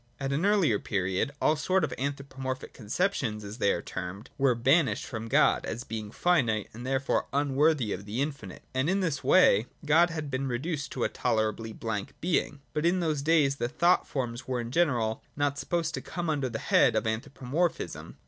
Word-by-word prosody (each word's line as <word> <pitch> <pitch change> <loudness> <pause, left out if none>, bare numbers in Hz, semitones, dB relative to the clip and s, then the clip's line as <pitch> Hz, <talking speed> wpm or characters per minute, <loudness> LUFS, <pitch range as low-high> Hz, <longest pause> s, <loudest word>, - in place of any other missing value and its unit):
At 135 0 -2
an 160 +8 +1
earlier 180 - +3
period 95 +6 -1
all 155 - +3
sort 185 +4 +1
of 140 -5 -1
anthropomorphic 135 -1 -4
conceptions, 115 - -1
as 105 +4 -8
they 100 - +3
are 85 - -2
termed, 95 +4 -6
were 135 -3 +3
banished 135 +6 +2
from 115 -2 -5
God, - - +3
as 120 - -4
being 110 -4 -5
finite 120 - +1
and 120 +3 -7
therefore 135 +1 0
unworthj' 140 -3 +2
of 100 - -6
the 105 +4 -4
infinite; 140 -9 -4
and 130 +4 +1
in 195 +1 +1
this 165 -6 -1
way 120 - +5 0.2
God 165 +4 +5
had 155 -4 -5
been 130 +1 -1
reduced 145 +4 -3
to 125 - -2
a - - +1
tolerabl}' 110 0 -1
blank 110 +4 -4
being. 155 -4 0
But 150 +2 +1
in 180 +2 +2
those 155 -4 0
days 145 -3 +3
the 120 - -1
thought 170 +5 +3
forms 120 -2 -4
were 130 -1 -1
in 120 0 -5
general 125 -9 +1
not 145 0 0
supposed 170 -1 -1
to - - -3
come 175 -3 -3
under 140 -4 -1
the 110 - -4
head - - +3
of - - +1
anthropomorphism. 135 +8 -2
135 Hz, 190 wpm, -28 LUFS, 115-155 Hz, 0.2 s, way